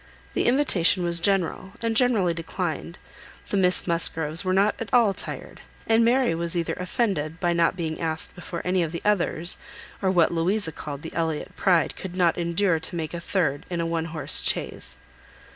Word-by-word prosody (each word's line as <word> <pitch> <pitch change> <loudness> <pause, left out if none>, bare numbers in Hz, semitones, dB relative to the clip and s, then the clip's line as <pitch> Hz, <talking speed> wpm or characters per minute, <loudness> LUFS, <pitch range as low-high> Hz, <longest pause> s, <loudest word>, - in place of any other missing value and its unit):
The - - 0
invitation 205 - +3
was 170 0 +1
general, 190 +1 0
and 230 -1 -1
generally 220 -8 +3
declined. 165 0 -4 0.5
The - - -1
Miss 180 -1 +4
Musgroves 165 -1 +1
were 185 - 0
not 200 +3 +3
at 230 - -6
all 235 -5 +4
tired, - - -8 0.2
and 225 +1 +4
Mary 245 -2 +3
was 170 +1 -2
either 170 - -1
offended, 180 -5 -1
by 175 -1 +1
not 170 +1 +2
being 160 -3 -4
asked 160 0 -2
before 175 -1 -7
any 180 0 +1
of 165 -2 -1
the 170 - -5
others, 180 -4 +3 0.4
or 190 - +2
what 175 -3 +3
Louisa 170 +2 +1
called 145 -2 -7
the 165 - -7
Elliot 160 -2 -2
pride 180 -4 +2
could 185 -2 -7
not 175 -3 +3
endure 170 0 +1
to 160 +2 -6
make 160 -2 -4
a 170 - -4
third 160 -5 -1
in 175 -2 -3
a 170 - 0
one 165 -1 -1
horse 160 -1 0
chaise. 65 +1 -1
175 Hz, 185 wpm, -25 LUFS, 165-195 Hz, 0.5 s, Miss